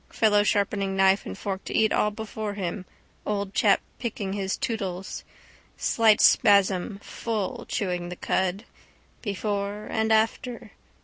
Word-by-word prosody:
Fellow 210 -2 +3
sharpening 200 -2 0
knife 195 +1 +3
and - - -6
fork 195 -1 -4
to - - -5
eat 220 -1 +3
all 210 - +2
before 215 -1 -5
him, 185 0 -4 0.4
old 200 -1 -2
chap - - +4 0.2
picking 205 -5 -3
his 195 -1 -2
tootles. 195 -8 -4 0.5
Slight 220 -2 +3
spasm, 195 0 +4
full, 220 -4 -4
chewing 180 -3 -2
the 180 - -6
cud. 190 +4 -1 0.6
Before 205 0 -3
and 220 0 -1
after. 225 +2 0
205 Hz, 130 wpm, -26 LUFS, 195-220 Hz, 0.6 s, chap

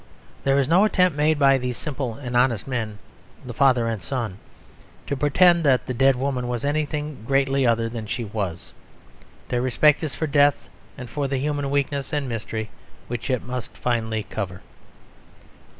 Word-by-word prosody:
There 135 0 +3
is 140 -2 +2
no 175 +6 +5
attempt 180 -6 +3
made 150 +1 +2
by 135 -2 +5
these 125 -1 -3
simple 135 -6 -4
and 125 -1 -6
honest 120 -3 +2
men, 110 -5 -3 0.5
the 125 - -6
father 130 -3 +3
and 110 -3 -2
son, 115 -8 -4 0.7
to 140 - -2
pretend 170 +5 +4
that 135 -4 +3
the 130 - -3
dead 135 +2 +4
woman 125 -1 -2
was 120 +1 -3
anything 150 -3 -2
greatly 135 +1 +2
other 115 -1 +2
than 115 -2 -6
she 120 +3 -3
was; 100 -5 -5 0.8
their 120 -1 0
respect 140 +4 +3
is 155 - -3
for 160 - -1
death, 145 -1 +3 0.3
and 125 -3 -7
for 140 +4 -2
the 135 0 -1
human 145 0 -1
weakness 140 0 -1
and 145 -2 -1
mystery 110 -2 -4 0.4
which 120 +1 -4
it 125 -3 0
must 125 -1 -6
finally 110 -3 -1
cover. 95 -4 -5
130 Hz, 170 wpm, -23 LUFS, 115-145 Hz, 0.8 s, no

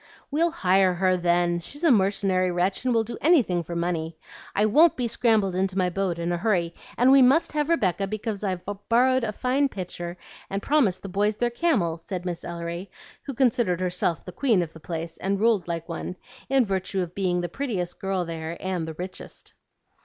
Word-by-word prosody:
"We'll 325 +4 +2
HIRE 190 - +2
her, 185 +1 +2
then; 175 -1 +1
she's 285 - -10
a 330 - +5
mercenary 190 -3 +2
wretch 180 +4 0
and 255 - +1
will 225 -2 +3
do 230 - -7
anything 260 - +3
for 170 +2 -6
money. 170 -2 -2 0.4
I 210 - +3
won't 305 +10 +5
be 245 -2 0
scrambled 220 -5 +2
into 190 0 -1
my 180 -1 +1
boat 185 -2 -1
in 170 +1 -2
a 175 - 0
hurry, 175 -3 0 0.2
and 250 +3 +5
we 275 0 +7
MUST 270 +6 +4
have 300 0 -1
Rebecca 195 - +1
because 215 0 -4
I've 185 -3 -2 0.3
borrowed 255 +2 +4
a 220 - -1
fine 260 +5 +1
pitcher 175 -4 -6 0.3
and 195 - -2
promised 240 -6 +1
the 195 - -6
boys 205 +3 +1
their 240 0 0
camel," 235 - 0
said 180 +1 -6
Miss 175 -1 -4
Ellery, 170 +2 -5 0.3
who 275 - -7
considered 230 -8 +2
herself 180 -2 -1
the 180 - -7
queen 210 -2 +2
of 165 -1 -8
the 160 - -12
place 165 0 -5
and 195 +1 -1
ruled 215 -5 +2
like 165 -1 -4
one, 175 +1 -5 0.3
in 270 -2 +4
virtue 190 -1 -2
of 175 -1 -5
being 180 -2 0
the 175 - -2
prettiest 185 - -3
girl 190 -2 -1
there 165 0 -5
and 185 -3 -3
the 160 - -6
richest. 185 +3 -8
190 Hz, 200 wpm, -25 LUFS, 175-235 Hz, 0.4 s, we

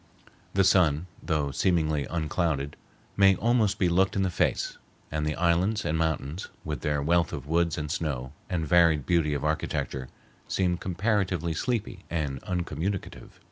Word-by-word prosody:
The 100 - +5
sun, 90 -4 +4 0.2
though 75 -4 0
seemingly 80 -2 +1
unclouded, 80 -3 -1 0.4
may 95 -1 +6
almost 110 -3 +2
be 95 - +2
looked 95 +4 +2
in 100 - +2
the 95 - 0
face, - - 0 0.3
and 75 0 -1
the 75 - -1
islands 90 +5 +1
and 80 - 0
mountains, 80 0 -1 0.2
with 75 -2 -3
their 75 -2 0
wealth 85 +2 +2
of - - -5
woods 85 +1 +1
and 75 -1 -3
snow 70 -5 -3 0.2
and 85 -4 -1
varied 80 -3 +4
beauty 80 -4 +2
of 70 - -3
architecture, 70 -3 -2 0.4
seem 90 -2 +1
comparatively 90 -3 0
sleepy 105 -1 -2
and 75 -6 -2
uncommunicative. 90 +1 -4
85 Hz, 150 wpm, -27 LUFS, 75-95 Hz, 0.4 s, may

